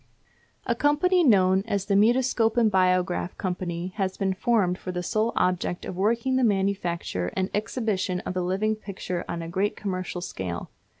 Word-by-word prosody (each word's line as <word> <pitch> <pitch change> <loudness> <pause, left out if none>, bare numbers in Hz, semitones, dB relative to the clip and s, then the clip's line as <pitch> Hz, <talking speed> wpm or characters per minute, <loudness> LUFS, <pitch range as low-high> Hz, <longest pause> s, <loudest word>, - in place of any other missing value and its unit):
A 235 - +1
company 300 +8 +3
known 190 - +4
as 200 -3 -1
the 200 - 0
Mutoscope 235 +1 +3
and 225 -3 +4
Biograph 185 -1 +1
Company 180 -1 -3
has 190 -2 -1
been 190 -1 0
formed 185 -3 +1
for 185 - -5
the 180 0 -3
sole 220 +3 0
object 180 -1 0
of - - -5
working 230 +7 +1
the 260 - +2
manufacture 190 - 0
and 190 +1 0
exhibition 210 -4 -1
of - - -4
the 185 - -1
living 195 +5 0
picture 190 -4 -5
on 170 -1 -3
a - - -6
great 195 +5 -1
commercial 185 -3 -4
scale. 90 - -5
190 Hz, 170 wpm, -26 LUFS, 180-220 Hz, -, known